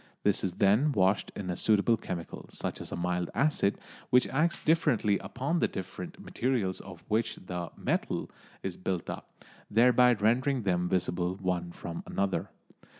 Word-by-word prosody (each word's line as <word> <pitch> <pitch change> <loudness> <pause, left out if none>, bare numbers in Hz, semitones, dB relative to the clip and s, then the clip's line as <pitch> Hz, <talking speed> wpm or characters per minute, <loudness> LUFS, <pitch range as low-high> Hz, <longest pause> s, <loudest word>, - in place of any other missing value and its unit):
This - - +2
is 95 - -1
then 110 +12 +3
washed 95 -1 +2
in 90 -3 -3
a - - -2
suitable 110 +3 +3
chemical, 85 -5 -6
such - - -4
as - - -8
a - - -2
mild 90 0 -1
acid, 135 -8 +2 0.3
which 125 0 +5
acts 160 +5 +2
differently 120 -10 +2
upon 140 +8 -2
the - - +3
different 95 -1 -7
materials 115 -7 -1
of 90 -3 -11
which 110 +1 +1
the 90 -2 -5
"metal" - - -1 0.3
is 95 -2 -3
built 90 -2 -2
up, - - -8 0.4
thereby 125 +2 +6
rendering 120 +4 +2
them 90 -2 +1
visible 90 -1 0
one 90 -2 -2
from 85 -1 -6
another. 100 0 -1
100 Hz, 155 wpm, -30 LUFS, 90-125 Hz, 0.4 s, thereby